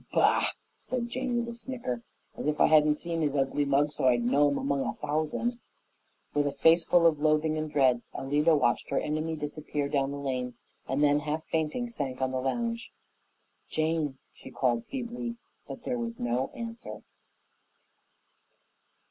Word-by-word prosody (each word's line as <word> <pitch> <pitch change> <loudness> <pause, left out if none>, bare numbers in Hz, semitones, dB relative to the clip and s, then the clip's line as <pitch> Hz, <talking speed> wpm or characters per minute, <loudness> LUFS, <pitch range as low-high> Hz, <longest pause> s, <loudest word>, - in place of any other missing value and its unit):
"Bah!" - - +4 0.3
said 245 -2 -3
Jane 250 0 -1
with 235 0 -1
a 235 - -5
snicker, 235 - -4 0.3
"as - - -4
if 150 0 0
I - - +7
hadn't 150 -1 +5
seen 165 +1 -3
his 145 -2 0
ugly 140 +1 +1
mug 140 +1 +2
so 135 - +1
I'd 120 -2 +4
know 145 +4 +4
it - - 0
'mong 140 0 0
a - - -2
thousand." 155 +11 -1 0.7
With 145 0 +2
a - - 0
face 160 +5 +5
full 175 -1 +4
of 155 -3 +4
loathing 155 0 +3
and 155 -1 -3
dread, 130 -4 +3
Alida 150 +4 +3
watched 130 -5 +1
her - - +1
enemy 155 +2 -2
disappear 150 -1 -3
down 140 -1 +1
the 140 - -4
lane, 130 -3 -3 0.3
and 135 +3 +1
then, 145 0 +4
half 155 +2 -3
fainting, 160 +10 0
sank 140 - -4
on 130 -1 0
the 130 -1 -1
lounge. 230 - -2 0.8
"Jane!" 155 -3 0 0.2
she - - -12
called 120 -3 0
feebly, 240 -2 -4 0.3
but 245 - -8
there 250 -1 -2
was 235 -1 -4
no 120 +2 0
answer. 230 0 -7
150 Hz, 170 wpm, -29 LUFS, 140-175 Hz, 0.8 s, I